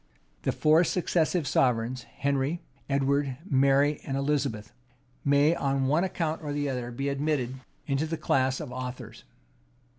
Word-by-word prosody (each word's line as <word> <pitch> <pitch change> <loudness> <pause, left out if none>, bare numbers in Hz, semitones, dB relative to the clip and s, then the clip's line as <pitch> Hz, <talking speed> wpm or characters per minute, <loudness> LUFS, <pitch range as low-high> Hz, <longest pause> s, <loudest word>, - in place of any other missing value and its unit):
The - - 0
four 155 +3 +4
successive 170 -2 +1
sovereigns, 125 0 +1
Henry, 140 +4 0 0.3
Edward, 140 -1 +1
Mary, 140 +1 +3
and 135 -1 -3
Elizabeth, 140 -7 -1 0.5
may, 140 +3 +4
on 135 -4 0
one 150 +6 +2
account 165 -4 -2
or 150 - -5
other, 140 -4 -2
be 135 +4 -3
admitted 140 -3 -1 0.3
into 140 +1 0
the 165 +1 -3
class 130 -2 +1
of 150 -5 -6
authors. 125 0 -7
140 Hz, 130 wpm, -28 LUFS, 130-150 Hz, 0.5 s, four